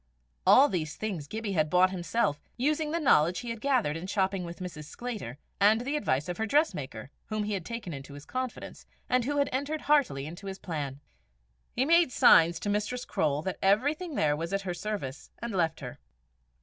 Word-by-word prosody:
All 280 - +8
these 160 - -3
things 190 -9 -4
Gibbie 220 +3 -4
had 155 -5 +1
bought 180 +2 +4
himself, 175 -4 -1 0.2
using 300 +4 +1
the 335 +2 -1
knowledge 175 - +3
he 240 -1 -5
had 230 -1 -6
gathered 255 - +1
in 165 +3 -5
shopping 190 -1 0
with 170 0 -7
Mrs. 175 -5 -7
Sclater, 210 - -6 0.2
and 215 +3 +5
the 280 +4 -2
advice 145 - 0
of 180 - -4
her 220 - -1
dressmaker, 150 - 0 0.2
whom 215 -1 -2
he 210 0 -2
had 190 -4 -2
taken 230 -4 -6
into 140 0 -9
his 145 - -11
confidence, 255 -1 -5 0.2
and 250 -1 +2
who 290 +2 -1
had 280 - +3
entered 285 +4 -2
heartily 270 - +2
into 175 +6 -8
his 190 0 -5
plan. 145 -7 -5 0.7
He 260 - +2
made 335 -2 +4
signs 165 -7 +6
to - - -4
Mistress 210 +5 -1
Croale 150 -1 0
that 190 0 -4
everything 290 - +1
there 150 -7 +2
was 165 +3 -4
at 195 0 0
her 180 -2 -3
service, 175 -9 -5
and 235 -1 -5
left 165 -4 0
her. 125 -2 -8
195 Hz, 200 wpm, -29 LUFS, 160-250 Hz, 0.7 s, All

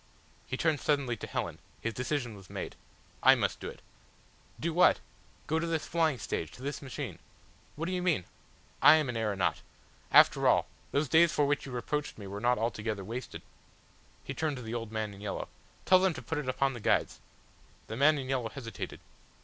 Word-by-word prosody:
He 130 - -3
turned 155 -2 +2
suddenly 140 -5 +1
to - - -7
Helen. - - -3 0.2
His 115 - -2
decision 125 -1 -2
was 95 -3 -14
made. - - -5 0.5
"I - - +8
must - - -1
do - - -5
it." - - -12 0.8
"Do 170 0 -1
what?" 180 +2 +5 0.5
"Go 160 +2 +1
to 170 - -2
this 165 -2 -1
flying 160 -5 +1
stage 80 -7 -3
to 125 - -12
this 140 0 -3
machine." 135 - -6 0.6
"What 155 +3 -3
do 180 - -2
you 180 -1 -1
mean?" 170 - +2 0.6
"I 155 - +9
am 155 -4 +1
an 120 - -3
aeronaut. 100 -5 0 0.5
After - - +6
all. - - +4 0.3
Those 145 +2 +1
days 160 +5 +5
for 145 - +2
which 145 0 0
you - - -7
reproached 150 +4 -3
me 105 - -8
were 100 +1 -6
not 125 +2 +3
altogether 110 -2 -2
wasted." 120 +6 -6 0.8
He - - -5
turned 155 -3 -1
to 125 - -7
the 110 +1 -5
old 115 -2 -4
man 110 -2 -3
in 100 - -12
yellow. 105 -1 -4 0.4
"Tell 185 - +7
them 185 -3 +2
to - - -6
put 160 -2 -2
it 135 -3 -3
upon 135 +1 +1
the 120 - -7
guides." - - +1 0.7
The 110 - -6
man 150 +5 +5
in 135 -2 -4
yellow 130 -4 -1
hesitated. 110 -8 -7
130 Hz, 200 wpm, -31 LUFS, 110-155 Hz, 0.8 s, I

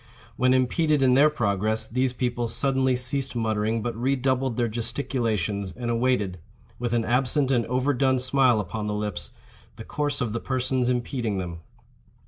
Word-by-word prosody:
When 130 0 +2
impeded 145 +3 +2
in 130 -1 +5
their 140 +4 +6
progress, 110 -5 0
these 130 +2 0
people 120 -1 -2
suddenly 130 +1 +1
ceased 130 +2 -2
muttering, 110 -1 0
but 120 - -3
re 130 +4 +1
doubled 130 -2 0
their 120 -1 +1
gesticulations, 110 -5 -2
and 120 -1 -3
awaited, 115 -7 0 0.4
with 120 -1 -2
an 115 -1 +1
absent 130 +3 +1
and 120 -3 +1
overdone 130 +1 +1
smile 130 -2 +3
upon 105 +2 -4
the 105 - -2
lips, 100 -10 -3 0.5
the - - -9
course 145 -1 -2
of 120 -5 -2
the 115 - -1
persons 130 -1 0
impeding 120 -3 -1
them. 85 -3 -5
125 Hz, 160 wpm, -25 LUFS, 110-130 Hz, 0.5 s, their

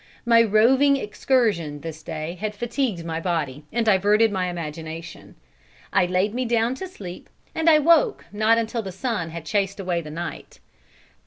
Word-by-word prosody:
My 230 -1 +6
roving 255 +6 +4
excursion 210 - 0
this 160 0 -7
day 160 0 -5
had 215 -1 -3
fatigued 235 -6 -2
my 165 -1 -3
body 155 -5 -2
and 235 0 0
diverted 210 +2 +4
my 185 -2 -1
imagination. 165 -1 -7 0.6
I 185 -3 +3
laid 185 +4 0
me 255 +2 -1
down 235 0 +1
to 380 - -3
sleep, 185 - -10 0.2
and 320 +1 +2
I 310 - +7
woke 335 - +3
not 215 +2 +3
until 230 +1 -1
the 195 -3 -6
sun 190 -3 -3
had 165 -1 -8
chased 200 +2 -1
away 180 -3 -1
the 155 - -9
night. 170 +3 -7
205 Hz, 165 wpm, -23 LUFS, 170-235 Hz, 0.6 s, I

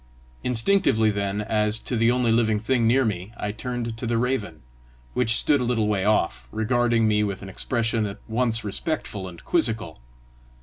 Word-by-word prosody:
Instinctively 115 - +3
then, 100 0 -2
as 105 0 +1
to 120 - -4
the 115 +1 +3
only 125 -1 +2
living 110 -2 +2
thing 115 +2 +1
near 130 +3 +3
me, 100 -2 -3
I 105 - -3
turned 115 +1 -4
to 120 - -4
the 115 0 0
raven, 115 - -2 0.5
which 115 -2 +3
stood 145 -3 +3
a - - 0
little 115 -3 0
way 100 -2 0
off, 85 -12 +1
regarding 115 0 +1
me 105 0 +2
with 100 -1 -3
an 95 - -8
expression 115 +1 -1
at 100 +1 -7
once 115 0 0
respectful 105 - -3
and 85 -2 -12
quizzical. 115 - 0
110 Hz, 175 wpm, -24 LUFS, 105-120 Hz, 0.5 s, Instinctively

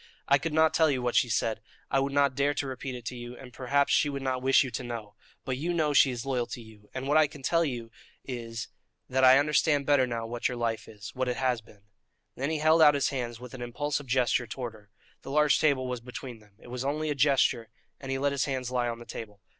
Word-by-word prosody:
"I 140 0 +5
could 165 +3 -3
not 160 +1 +4
tell 160 -1 +4
you 135 -3 0
what 125 -1 -1
she 120 - +4
said; 110 -1 0 0.3
I 135 - +3
would 135 +1 -1
not 140 -1 +3
dare 140 +2 +1
to 140 - -2
repeat 130 0 -5
it 120 -2 -9
to 125 - -4
you, 120 0 -8
and 125 -2 -12
perhaps 135 +3 +1
she 145 - +3
would 140 -1 -4
not 130 -1 -1
wish 135 +2 +5
you 130 - -5
to 125 - -4
know; 115 -4 -6 0.3
but 130 -1 -2
you 170 +5 -2
know 155 -3 +1
she 140 - +6
is 120 -1 -4
loyal 125 -3 -1
to - - -7
you, 110 -2 -15
and 130 +1 -4
what 145 +2 +3
I 155 -1 +5
can 145 -1 -13
tell 165 +4 +2
you 120 -6 -4 0.3
is, 115 -3 -5 0.4
that 130 +1 +1
I 130 +1 +8
understand 145 0 +2
better 140 -3 +4
now 115 -2 -3
what 120 +1 -2
your 125 - -4
life 115 -1 -2
is 105 -2 -10
what 130 0 -2
it 125 - -2
has 125 -3 0
been." 105 -2 -20 0.5
Then 140 +3 -2
he 160 - 0
held 155 +2 +4
out 150 -2 +7
his 140 -2 +1
hands 120 -4 -4
with 125 0 -10
an 130 - -8
impulsive 145 +4 -3
gesture 125 -1 +1
towards 120 +1 -5
her. 105 -2 -18 0.3
The - - -9
large 150 +1 +3
table 140 -5 +2
was 125 -2 -4
between 125 -1 -8
them; 105 -2 -22
it 120 - -15
was 125 +1 -4
only 150 +2 -1
a - - +2
gesture, 135 -5 +2 0.3
and 135 -1 -6
he 135 - 0
let 140 +1 +1
his 140 -2 0
hands 130 -3 -3
lie 125 -1 0
on 115 - -4
the 120 - -11
table. 105 -4 -8
130 Hz, 265 wpm, -28 LUFS, 120-140 Hz, 0.5 s, I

